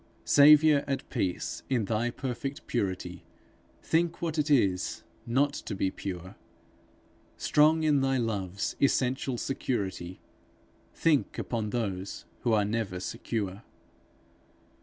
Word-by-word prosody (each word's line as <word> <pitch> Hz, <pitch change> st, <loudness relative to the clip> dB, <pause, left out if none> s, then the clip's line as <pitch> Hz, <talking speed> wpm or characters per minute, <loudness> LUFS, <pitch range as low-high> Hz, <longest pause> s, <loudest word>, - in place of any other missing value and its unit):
Saviour, 150 Hz, 0 st, +7 dB
at 135 Hz, -1 st, -2 dB
peace 90 Hz, -2 st, -2 dB
in 120 Hz, -5 st, +1 dB
thy 115 Hz, +3 st, 0 dB
perfect 135 Hz, +3 st, -5 dB
purity, 95 Hz, -6 st, -3 dB, 0.6 s
Think 170 Hz, +1 st, +1 dB
what 160 Hz, -2 st, -2 dB
it 150 Hz, +1 st, 0 dB
is, 100 Hz, -10 st, +2 dB, 0.2 s
not 140 Hz, +4 st, +2 dB
to 100 Hz, -, -5 dB
be 95 Hz, 0 st, 0 dB
pure! 90 Hz, 0 st, -7 dB, 1.0 s
Strong 155 Hz, +2 st, +4 dB
in 150 Hz, -3 st, +3 dB
thy 135 Hz, 0 st, +2 dB
love's 100 Hz, -5 st, -2 dB
essential 130 Hz, -1 st, +1 dB
security, 95 Hz, -9 st, -3 dB, 0.7 s
Think 155 Hz, -4 st, +1 dB
upon 110 Hz, -3 st, -2 dB
those 100 Hz, -4 st, -3 dB
who 120 Hz, -, 0 dB
are 105 Hz, -2 st, +3 dB
never 105 Hz, -4 st, -2 dB
secure. 100 Hz, +1 st, -4 dB
120 Hz, 115 wpm, -29 LUFS, 95-140 Hz, 1.0 s, Saviour